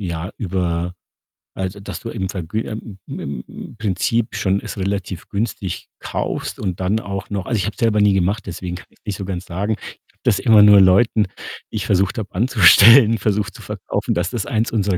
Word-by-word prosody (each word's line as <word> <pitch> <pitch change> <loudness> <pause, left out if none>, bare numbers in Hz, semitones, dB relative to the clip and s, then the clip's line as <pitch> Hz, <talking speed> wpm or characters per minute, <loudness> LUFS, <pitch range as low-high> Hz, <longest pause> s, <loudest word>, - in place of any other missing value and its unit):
ja, 85 -1 -4
über 90 -3 -2 0.6
also, 95 +1 -4
dass 100 -3 -7
du 115 - -7
im 95 -3 -3
Vergü 95 +2 -3
im 110 -2 -7
im 70 - -5
im - - -10
Prinzip 110 +3 -1
schon 95 +1 +1
es - - -7
relativ 95 -2 -3
günstig 100 -3 -3
kaufst - - -4
und 95 -4 -3
dann 95 +4 +1
auch 100 -2 -6
noch 100 -2 -3
also, 120 - -1
ich 95 - -1
habe 105 - -3
es - - -18
selber 110 -2 +2
nie 105 -1 +5
gemacht, 95 +3 0
deswegen 90 -1 -5
kann - - -10
ich's - - -30
nicht 105 - -3
so 100 - -5
ganz 95 -1 -5
sagen. 100 +5 -2
Ich - - -12 0.3
habe - - -40
das 95 - +2
immer 110 -5 +6
nur 105 -1 +8
Leuten, 100 +3 +4 0.5
die - - -8
ich - - -2
versucht 95 +1 +1
habe 105 -4 -5
anzustellen, 115 +2 +7
versucht 105 0 -1
zu - - -12
verkaufen, - - -3
dass 85 +1 0
das 115 -6 -3
eins 110 +1 0
unserer 100 -4 +1
100 Hz, 210 wpm, -20 LUFS, 95-110 Hz, 0.6 s, nur